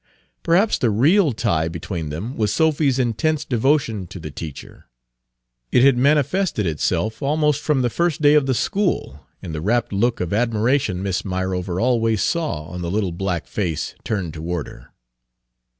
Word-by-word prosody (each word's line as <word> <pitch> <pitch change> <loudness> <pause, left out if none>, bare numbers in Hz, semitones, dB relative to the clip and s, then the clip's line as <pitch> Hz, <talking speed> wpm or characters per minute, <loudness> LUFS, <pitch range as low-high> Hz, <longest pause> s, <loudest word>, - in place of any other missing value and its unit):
Perhaps 185 +6 +2
the 120 - +2
real 150 - +4
tie 95 -9 0
between 85 -1 -5
them 100 - -5
was 105 -2 0
Sophy's 145 0 +2
intense 135 +5 0
devotion 120 -6 +1
to 90 - -9
the 75 -2 -7
teacher. 75 -4 -9 0.8
It 125 - +4
had 135 -1 +6
manifested 145 - +2
itself 100 +7 -1
almost 150 0 +1
from 145 -5 +1
the 120 - +2
first 170 +4 0
day 145 -1 +5
of 150 -3 +4
the 130 - +1
school, 180 - -1 0.2
in 85 - -6
the 75 -1 -4
rapt 115 +5 0
look 115 +4 +1
of 90 +1 -2
admiration 115 -2 +1
Miss 95 -2 -1
Myrover 95 -1 -2
always 115 -3 +2
saw 155 - -1
on 90 +3 -7
the 85 - -3
little 100 -1 -1
black 85 -1 -3
face 90 -7 -3
turned 95 -8 -3
toward 85 +1 -3
her. - - -15
110 Hz, 165 wpm, -21 LUFS, 90-140 Hz, 0.8 s, had